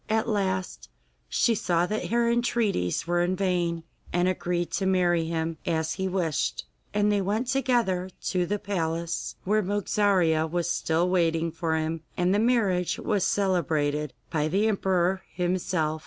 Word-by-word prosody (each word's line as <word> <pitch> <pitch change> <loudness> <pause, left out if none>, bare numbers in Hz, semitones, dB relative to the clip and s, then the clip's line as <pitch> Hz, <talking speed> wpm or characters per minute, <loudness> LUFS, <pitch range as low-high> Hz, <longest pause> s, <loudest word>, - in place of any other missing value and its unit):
At 220 +1 +1
last 190 - -2 0.4
she 235 - +2
saw 175 -5 +1
that 215 +4 -2
her 235 0 +2
entreaties 235 - 0
were 175 +1 +1
vain, 180 -3 0 0.3
and 175 +1 +2
agreed 175 -1 -1
to 190 - 0
marry 175 -3 +2
him, 165 0 -2
as 160 -1 -1
he 190 - -2
wished. 170 - -1 0.3
And 210 0 +2
they 205 -1 +2
went 210 +6 0
together 240 -9 +1 0.2
to 180 -2 0
the 205 +3 0
palace, 170 -4 -3
where 215 +3 +2
Mogarzea 190 -5 +2
was 175 +1 -1
still 165 +1 +1
waiting 165 -2 +1
for 165 0 -1
him, 160 0 -2 0.2
and 180 +1 +2
the 205 - +3
marriage 210 -7 +2
was 205 -4 0
celebrated 155 -7 0 0.2
by 155 -1 +1
the 195 +7 +2
emperor 190 -3 +1
himself. 175 -3 0
180 Hz, 150 wpm, -26 LUFS, 165-205 Hz, 0.4 s, the